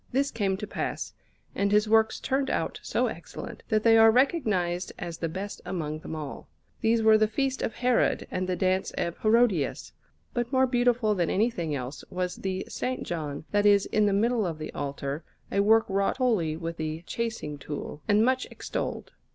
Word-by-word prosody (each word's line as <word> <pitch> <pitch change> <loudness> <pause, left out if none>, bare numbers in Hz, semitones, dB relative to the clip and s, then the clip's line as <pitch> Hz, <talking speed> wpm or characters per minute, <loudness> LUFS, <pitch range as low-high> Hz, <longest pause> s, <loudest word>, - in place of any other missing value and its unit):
This 275 +2 +1
came 195 -4 0
to 210 - -5
pass; - - -4 0.4
and 200 0 0
his 210 +1 +4
works 220 0 +3
turned 270 0 0
out - - -1
so - - 0
excellent, - - -7
that 215 -2 +2
they 225 -1 +6
are 225 0 +8
recognized 210 - +1
as 170 -2 -6
the 165 - -1
best 195 +5 -5
among 155 -4 -3
them 160 - -7
all. 150 -3 -7 0.3
These 225 0 +2
were 220 0 +6
the 215 - +4
Feast 265 +4 -1
of 225 - -2
Herod 250 -1 +2
and 185 0 -2
the 180 - +1
Dance 185 +1 +1
of 170 0 -2
Herodias; 215 - +2 0.4
but 240 0 -2
more 260 -1 +4
beautiful 245 -3 +2
than 175 -4 0
anything 185 -8 0
else 130 +1 -5
was 180 0 -3
the 190 -1 -3
S. - - -9 0.2
John 155 -3 -4
that 205 0 +3
is 200 -1 +5
in 210 -1 +2
the - - +2
middle 225 +3 +2
of 165 -2 -4
the 155 - -6
altar, 140 +1 -4 0.3
a 200 - +1
work 220 +2 +5
wrought 195 0 0
wholly 205 - +1
with 165 0 -5
the 155 +1 -4
chasing 225 -11 -4
tool, 145 +1 -6
and 210 +1 +4
much 260 0 +1
extolled. - - -4
200 Hz, 190 wpm, -27 LUFS, 170-230 Hz, 0.4 s, are